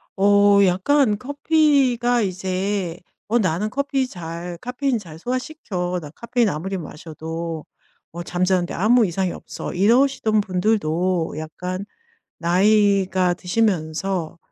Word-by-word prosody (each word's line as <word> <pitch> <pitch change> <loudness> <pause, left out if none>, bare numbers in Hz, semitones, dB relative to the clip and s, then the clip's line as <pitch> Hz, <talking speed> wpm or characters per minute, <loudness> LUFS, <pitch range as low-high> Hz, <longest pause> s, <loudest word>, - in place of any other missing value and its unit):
어 200 +1 +5
약간 210 +5 +2
커피가 270 -3 +2
이제 185 -1 -2 0.3
"어 235 +3 +2
나는 185 +2 0
커피 275 +1 -1
잘 170 -3 -7
카페인 255 +1 -1
잘 165 -6 -11
소화시켜. 220 - -3
나 150 - -9
카페인 235 +4 0
아무리 190 +4 -3
마셔도 160 0 -6 0.5
어 170 +1 -6
잠자는 180 0 +1
데 - - -6
아무 225 +5 +4
이상이 185 +1 -1
없어." - - -7
이러시던 220 +2 +3
분들도 180 -4 0
약간 180 +5 -5 0.5
나이가 190 0 +3
드시면서 180 -3 -1
190 Hz, 250 characters per minute, -22 LUFS, 175-230 Hz, 0.5 s, 어